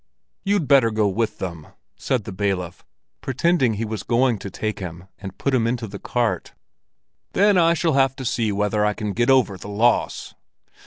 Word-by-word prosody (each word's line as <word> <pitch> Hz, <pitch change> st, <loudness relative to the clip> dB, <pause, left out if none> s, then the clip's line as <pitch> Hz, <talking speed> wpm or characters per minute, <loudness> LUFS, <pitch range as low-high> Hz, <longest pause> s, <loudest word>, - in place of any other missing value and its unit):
"You'd 200 Hz, -6 st, +1 dB
better 135 Hz, -5 st, +5 dB
go 110 Hz, -1 st, +1 dB
with 110 Hz, +3 st, -1 dB
them," 85 Hz, -5 st, -6 dB, 0.3 s
said 125 Hz, -5 st, -1 dB
the 105 Hz, -, -7 dB
bailiff, 95 Hz, -3 st, -3 dB, 0.4 s
pretending 135 Hz, -3 st, +1 dB
he 110 Hz, +2 st, -2 dB
was 110 Hz, -2 st, -4 dB
going 120 Hz, -1 st, +1 dB
to 100 Hz, -, -6 dB
take 110 Hz, +3 st, -4 dB
him 90 Hz, -1 st, -7 dB
and 95 Hz, -2 st, -8 dB
put 140 Hz, -, -1 dB
him 115 Hz, -3 st, +2 dB
into 120 Hz, -1 st, -2 dB
the 100 Hz, -2 st, -8 dB
cart. 115 Hz, -8 st, -2 dB, 0.8 s
"Then 205 Hz, +1 st, +4 dB
I 170 Hz, -1 st, +4 dB
shall 165 Hz, 0 st, +1 dB
have 135 Hz, -1 st, +3 dB
to 130 Hz, -, -7 dB
see 115 Hz, -2 st, 0 dB
whether 105 Hz, +1 st, 0 dB
I 105 Hz, 0 st, +1 dB
can 105 Hz, -2 st, -3 dB
get 120 Hz, +3 st, +1 dB
over 125 Hz, -7 st, +3 dB
the 100 Hz, -, -9 dB
loss." 115 Hz, +4 st, +1 dB
110 Hz, 190 wpm, -22 LUFS, 100-130 Hz, 0.8 s, better